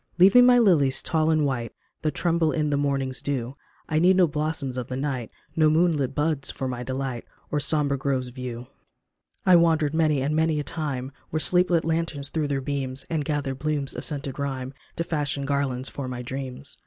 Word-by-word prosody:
Leave 190 +3 +7
me 245 - +9
my 245 0 +7
lilies 150 - +3
tall 160 -1 +1
and 155 -2 +3
white 120 -5 -2 0.3
That 155 - -1
tremble 170 -2 +2
in 150 -2 0
the - - +2
morning's 140 -2 -1
dew; 135 -2 -3 0.3
I 155 -1 +1
need 180 +3 +5
no 185 -1 +6
blossoms 150 -4 -2
of 125 -2 -3
the 130 - -4
night, 130 -4 -2 0.3
No 155 -1 +4
moonlit 155 -4 +2
buds 150 -2 0
for 135 - -4
my 125 -1 -4
delight 130 -1 -3 0.3
Or 150 - +1
sombre 145 -2 +1
groves 130 -2 -1
of 125 - -12
yew. 125 -2 -6 0.8
I 185 -2 +7
wandered 160 -3 +3
many 155 -3 +2
and 145 +3 0
many 160 -1 +2
a - - -1
time 140 -5 -3 0.2
Where 155 - -1
sleep 180 +3 +3
lit 170 -2 +2
lanterns 160 -4 -2
threw 155 -2 0
their 140 -1 -1
beams, 135 -1 -3
And 160 -2 0
gathered 140 -2 -2
blooms 145 -1 -1
of - - -6
scented 140 -2 -5
rhyme 135 -2 -3 0.2
To 170 - -1
fashion 145 -4 -2
garlands 135 -2 -1
for 140 -2 -6
my 125 -1 -5
dreams. 130 +2 -4
145 Hz, 205 wpm, -25 LUFS, 130-160 Hz, 0.8 s, me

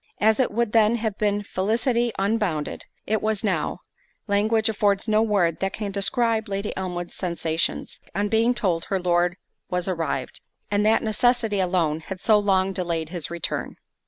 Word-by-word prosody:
As 220 +2 +3
it 260 - +3
would 235 0 0
then 225 0 +4
have 220 -3 -2
been 205 -1 +1
felicity 235 +5 0
unbounded, 195 -7 -1 0.2
it 215 0 0
was 215 -1 -1
now—language 215 +2 -1
affords 205 -2 +1
no 215 0 +3
word 195 -7 +1
that 195 0 -1
can 210 -2 -4
describe 220 +3 +1
Lady 200 +1 -3
Elmwood's 180 -2 -4
sensations, 170 -2 -2
on 205 +1 +1
being 225 +3 +2
told 175 -7 0
her 195 - -1
Lord 175 0 +1 0.3
was 180 0 -1
arrived, 170 -3 -3 0.3
and 205 0 +2
that 220 - +3
necessity 225 -1 +2
alone 175 -4 +1
had 185 +3 -7
so 215 +2 +4
long 195 -2 +2
delayed 170 -4 -2
his 175 -4 -5
return. 170 -1 -3
200 Hz, 160 wpm, -24 LUFS, 180-220 Hz, 0.3 s, then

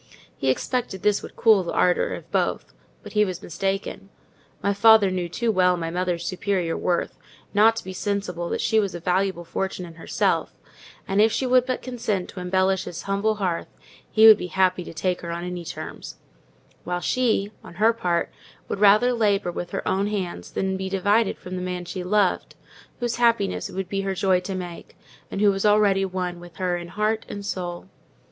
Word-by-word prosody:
He 135 - -1
expected 190 - -1
this 210 -1 +2
would - - -10
cool 220 -4 +5
the 170 - -4
ardour 180 -1 +2
of - - -12
both; - - -1 0.3
but - - -10
he 210 -1 +4
was 185 -1 -4
mistaken. 195 +2 -3 0.5
My 200 - +2
father 210 -1 +6
knew 180 -2 -2
too 235 +6 0
well 180 -2 +3
my 165 -1 -3
mother's 175 -1 -1
superior 185 -2 -1
worth 175 -1 -1 0.3
not 220 +2 +5
to 230 - -5
be 185 - -7
sensible 185 -3 -3
that - - -2
she 220 -1 +3
was 200 -4 -1
a - - -5
valuable 180 +1 0
fortune 190 +1 -3
in 170 - -11
herself: 165 - -1 0.5
and 195 +2 +2
if 220 +1 +5
she 265 - -1
would 255 0 +3
but 255 - -2
consent 230 -7 -2
to 190 - -8
embellish 185 +1 +1
his 170 - -7
humble 200 +2 0
hearth 185 -5 -2 0.4
he 220 0 +5
should 215 -1 +9
be 180 - -4
happy 185 -1 +1
to - - -8
take 180 +3 -2
her 170 - -6
on 170 +1 -4
any 180 -1 -5
terms; 165 - -7 0.7
while 175 0 -2
she, 220 0 +1
on - - -12
her 220 +4 +4
part, 175 -6 -1 0.4
would - - -3
rather 210 +5 +5
labour 205 -5 +1
with 175 0 -5
her - - -4
own 195 +2 +1
hands 185 - -4
than 190 0 -2
be 190 0 -4
divided 205 +3 +2
from 185 0 -7
the 180 - -3
man 180 -1 -4
she 180 +1 -5
loved, 200 +1 +1 0.4
whose 240 -1 -2
happiness 230 -4 +1
it - - -11
would 190 -1 -3
be 195 +1 -2
her 195 -1 -2
joy 185 -1 +2
to 190 +1 -5
make, 175 -2 -8 0.3
and 195 - -4
who 205 -1 +5
was 195 0 -2
already 205 -2 +4
one 180 -2 -3
with 175 -1 -13
her 180 -2 -1
in 175 0 -5
heart 215 +4 -1
and 200 0 -6
soul. 175 -2 -4
190 Hz, 200 wpm, -24 LUFS, 180-210 Hz, 0.7 s, should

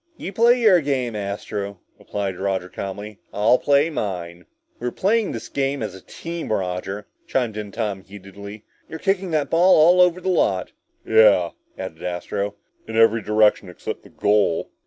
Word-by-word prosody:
"You 195 - -6
play 235 +4 +4
your 205 -7 +5
game, 130 -5 -1
Astro," 100 -1 -4 0.2
replied 100 -2 -3
Roger 95 -2 -2
calmly, 100 +2 -7
"I'll 110 +5 +3
play 145 +3 +3
mine." 90 - -4 0.3
"We're 125 - -2
playing 210 - +1
this 115 - -6
game 135 -2 -1
as 105 -4 -4
a 95 - -11
team, 170 -6 -6
Roger," 95 +1 -2 0.2
chimed 120 -5 -1
in 105 -1 -5
Tom 105 -4 -3
heatedly. 100 +2 -11 0.3
"You're 160 - -6
kicking 195 +2 0
the 155 -3 +1
ball 175 +5 +5
all 175 +4 +6
over 180 0 +4
the 185 - -6
lot!" 95 - +1 0.3
"Yeah," 105 -6 +5 0.3
added 95 -4 -7
Astro. 100 +3 -3 0.3
"In 110 0 -4
every 115 0 +5
direction 105 -2 +2
except 90 - -6
the - - -17
goal!" 100 -5 +1
105 Hz, 160 wpm, -22 LUFS, 100-150 Hz, 0.3 s, all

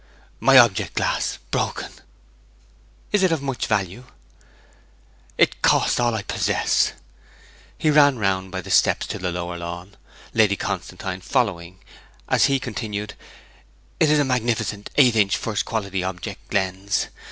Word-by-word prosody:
'My 135 0 +6
object 115 -6 +4
glass - - -1
broken!' - - -2 1.2
'Is 205 - +2
it 185 -2 +3
of 160 -4 -1
much 135 -3 -3
value?' 105 +3 -2 1.3
'It - - +2
cost - - +3
all 120 -2 +1
I 105 - -3
possess!' - - +1 0.8
He 155 - +2
ran 145 -3 +5
round 95 -3 -1
by 95 - -4
the - - -8
steps - - +3
to - - -5
the 90 -1 -2
lower 85 0 -4
lawn, 85 +3 -7 0.4
Lady 105 -3 +3
Constantine 95 -1 -5
following, 95 -6 -2 0.4
as - - +3
he 135 -1 +2
continued, 105 -3 -5 0.9
'It 155 - +4
is 150 - +4
a 145 - +3
magnificent 115 -5 -1
eight 125 -5 +5
inch 100 -3 +3
first 105 -2 -2
quality 100 -4 -3
object 90 -1 -6
lens! 95 0 -1
105 Hz, 140 wpm, -22 LUFS, 95-125 Hz, 1.3 s, My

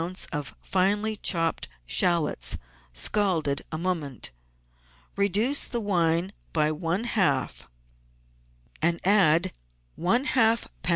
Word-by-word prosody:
of 145 -4 -4
finely 205 +3 +1
chopped 165 -5 0 0.2
shallots, 165 - +2 0.3
scalded 160 - 0
a 155 - -2
moment. 160 -7 -3 0.8
Reduce 205 +8 +1
the 240 - -1
wine 175 -3 +1 0.2
by 155 -1 +2
one 165 +6 -2
half, 145 - 0 1.1
and 170 +1 +1
add 185 -3 +4 0.4
one 210 +10 +2
half 230 -5 +2 0.2
lb. - - 0
180 Hz, 100 wpm, -26 LUFS, 155-205 Hz, 1.1 s, add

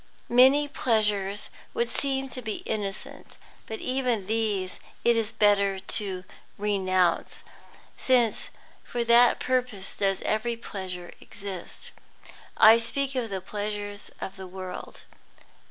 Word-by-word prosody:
Many 265 +4 +6
pleasures 210 -6 0 0.2
would 235 - +1
seem 270 +2 -1
to 255 - -4
be 220 -3 -5
innocent, 205 -2 -5 0.3
but 220 - -5
even 250 -6 0
these 210 -3 0 0.3
it 235 0 +5
is 225 -1 0
better 200 -2 +3
to 190 -1 -2 0.3
renounce, 185 -3 +1 0.5
since 245 -4 +2 0.3
for 240 -1 -2
that 235 +1 +5
purpose 250 -7 -1
does 195 -1 0
every 230 +2 0
pleasure 185 -5 -6
exist. 195 -3 -8 0.7
I 225 +2 +8
speak 275 +4 -1
of 250 -4 -2
the 190 -2 -3
pleasures 205 +1 -5
of 195 - -6
the 190 -1 -8
world. 185 0 -8
210 Hz, 120 wpm, -27 LUFS, 195-235 Hz, 0.7 s, I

